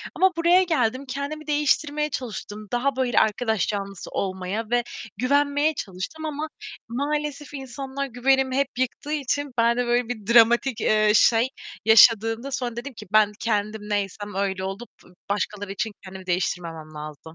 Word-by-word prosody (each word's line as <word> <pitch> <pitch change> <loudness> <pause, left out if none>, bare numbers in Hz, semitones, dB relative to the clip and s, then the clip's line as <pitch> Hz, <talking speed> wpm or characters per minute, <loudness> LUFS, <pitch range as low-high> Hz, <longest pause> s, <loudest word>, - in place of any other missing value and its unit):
ama 380 0 +4
buraya 345 +3 +5
geldim, 260 -6 0
kendimi 280 +4 -5
değiştirmeye 300 0 +1
çalıştım. 215 -5 -6
Daha 255 +3 +1
böyle 255 -3 +2
arkadaş 220 -1 +1
canlısı 200 -2 -4
olmaya 190 +3 -3
ve 240 0 +2 0.3
güvenmeye 285 +4 +2
çalıştım 200 - -6
ama 305 0 -3 0.4
maalesef 290 +3 -3
insanlar 270 +1 -5
güvenimi 260 +1 +1
hep 280 -1 +2
yıktığı 260 +3 -2
için 285 -2 -1
ben 235 +1 +3
de 245 - +1
böyle 240 0 +1
bir 220 -5 -5
dramatik, 235 +1 +5
eee, 215 0 +4
şey, 230 +2 +5 0.4
yaşadığımda 225 +3 +5
sonra 250 -3 -3
dedim 255 +4 -6
ki 215 -3 -11
ben 215 -1 +5
kendim 215 -1 -1
neysem 205 0 -2
öyle 195 -1 -1
olup 195 +5 -5 0.4
başkaları 205 0 -2
için 210 +3 -2
kendimi 190 -1 -10
değiştirmemem 170 -3 -2
lazım. 150 -1 -8
240 Hz, 145 wpm, -24 LUFS, 205-280 Hz, 0.4 s, buraya